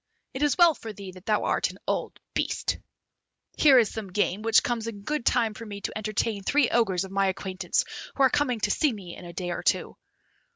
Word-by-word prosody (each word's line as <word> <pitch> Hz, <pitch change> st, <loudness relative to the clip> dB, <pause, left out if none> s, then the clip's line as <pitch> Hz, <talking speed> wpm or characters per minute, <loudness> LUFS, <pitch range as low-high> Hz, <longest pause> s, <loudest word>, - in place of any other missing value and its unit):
It 265 Hz, -, -5 dB
is 295 Hz, -3 st, +2 dB
well 345 Hz, -2 st, +7 dB
for 225 Hz, -6 st, -8 dB
thee 200 Hz, -2 st, -9 dB
that 185 Hz, +1 st, -15 dB
thou 215 Hz, -1 st, +2 dB
art -, -, +1 dB
an -, -, -11 dB
old -, -, -2 dB
beast! -, -, -1 dB, 0.8 s
Here 280 Hz, -4 st, +6 dB
is 230 Hz, -4 st, +3 dB
some 210 Hz, -4 st, -6 dB
game, 205 Hz, +1 st, 0 dB
which 225 Hz, 0 st, +4 dB
comes 230 Hz, -2 st, -2 dB
in 205 Hz, -3 st, -7 dB
good 300 Hz, +3 st, -2 dB
time 230 Hz, -3 st, +2 dB
for 225 Hz, -, -9 dB
me 205 Hz, -2 st, -7 dB
to -, -, -4 dB
entertain 215 Hz, 0 st, -1 dB
three 285 Hz, +6 st, +2 dB
Ogres 195 Hz, -7 st, +2 dB
of 190 Hz, -, -8 dB
my 195 Hz, 0 st, +2 dB
acquaintance 190 Hz, -1 st, -1 dB, 0.3 s
who 275 Hz, -, +2 dB
are 265 Hz, -, +6 dB
coming 270 Hz, -5 st, +1 dB
to 205 Hz, -, +1 dB
see 300 Hz, +4 st, +2 dB
me 190 Hz, -6 st, -8 dB
in 180 Hz, -, -11 dB
a 170 Hz, -, -9 dB
day 175 Hz, 0 st, -3 dB
or -, -, -3 dB
two." -, -, 0 dB
215 Hz, 225 wpm, -27 LUFS, 195-240 Hz, 0.8 s, well